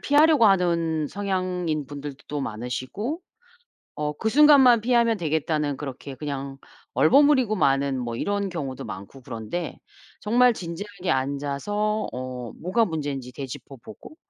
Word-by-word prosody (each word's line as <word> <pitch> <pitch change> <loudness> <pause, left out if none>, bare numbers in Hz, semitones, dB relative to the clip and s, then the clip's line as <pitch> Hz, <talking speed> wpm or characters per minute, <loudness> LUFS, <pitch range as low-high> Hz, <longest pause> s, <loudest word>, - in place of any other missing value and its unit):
피하려고 295 -4 +5
하는 170 -5 +2
성향인 185 -5 -2
분들도 145 0 -7
또 145 -1 -3
많으시고 130 - -4 0.7
어 150 0 -2
그 220 - -1
순간만 270 -3 +7
피하면 235 -1 +3
되겠다는 155 -3 -1
그렇게 135 -1 -7
그냥 140 -1 -5 0.4
얼버무리고 260 - +5
마는 140 -6 +2
뭐 120 -2 -3
이런 200 +7 -1
경우도 140 -8 -5
많고 100 +6 -9
그런데 125 +7 -5 0.4
정말 245 +3 +4
진지하게 185 0 -4
앉아서 145 +11 -1
어 125 -2 -5
뭐가 200 +7 +1
문제인지 145 -7 -4
되짚어보고 135 - -9
160 Hz, 305 characters per minute, -25 LUFS, 135-210 Hz, 0.7 s, 순간만